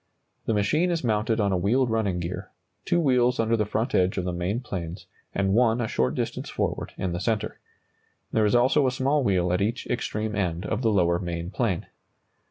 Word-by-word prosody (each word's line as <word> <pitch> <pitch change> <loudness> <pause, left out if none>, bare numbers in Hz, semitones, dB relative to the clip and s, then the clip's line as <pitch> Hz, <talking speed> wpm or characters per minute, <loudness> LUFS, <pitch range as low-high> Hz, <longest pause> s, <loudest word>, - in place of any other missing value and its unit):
The 115 - +2
machine 150 - +2
is 170 -3 -1
mounted 110 0 +1
on 100 -2 +2
a 95 - +2
wheeled 115 +7 +2
running 105 -5 0
gear, 85 +2 -5 0.4
two 175 - +2
wheels 125 -5 +3
under 115 0 +2
the 105 -2 0
front 110 +4 -1
edge 95 +1 +2
of 90 - -1
the 90 - -2
main 90 +6 -1
planes 90 -7 -6 0.3
and 95 0 +1
one 115 +1 +3
a 115 - 0
short 65 -9 0
distance - - -3
forward - - -2
in 95 - -2
the 85 - -2
centre. 110 +2 -2 0.7
There 110 -1 +3
is 105 - +2
also 130 +3 +4
a - - +2
small 135 +2 +1
wheel 90 -5 +2
at 90 - +1
each 115 +5 -1
extreme 110 -3 -2
end 90 -2 -1
of 110 +3 -2
the 115 - +2
lower 85 -4 +2
main 85 -1 -4
plane. 105 -7 -1
105 Hz, 205 wpm, -26 LUFS, 90-120 Hz, 0.7 s, also